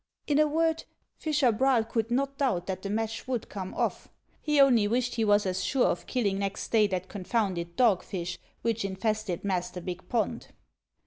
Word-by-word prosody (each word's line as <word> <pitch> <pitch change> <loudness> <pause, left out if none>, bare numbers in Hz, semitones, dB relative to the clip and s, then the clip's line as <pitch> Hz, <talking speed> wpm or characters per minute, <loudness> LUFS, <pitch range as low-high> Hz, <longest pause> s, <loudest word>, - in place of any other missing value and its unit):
In 290 -1 +2
a 305 - +5
word, 325 +1 +1 0.3
fisher 295 -6 +2
Braal 250 +1 +3
could 225 0 -2
not 275 +3 -1
doubt 215 -11 +1
that 190 -1 -4
the 200 - -5
match 225 +2 -2
would 250 -4 -2
come 190 -2 -5
off; - - -2 0.3
he 300 -1 +1
only 245 -7 +6
wished 245 +2 0
he 230 - 0
was 205 -1 +4
as 185 0 -1
sure 265 -3 +2
of - - -1
killing 200 -6 0
next 200 -1 -3
day 215 -2 +5
that 185 -2 -3
confounded 185 -4 -2
dogfish 185 -5 +1 0.2
which 230 -2 0
infested 200 -1 -2
Master 180 -2 -2
Bick 180 +1 -7
pond. 235 -3 -1
220 Hz, 180 wpm, -28 LUFS, 190-250 Hz, 0.3 s, only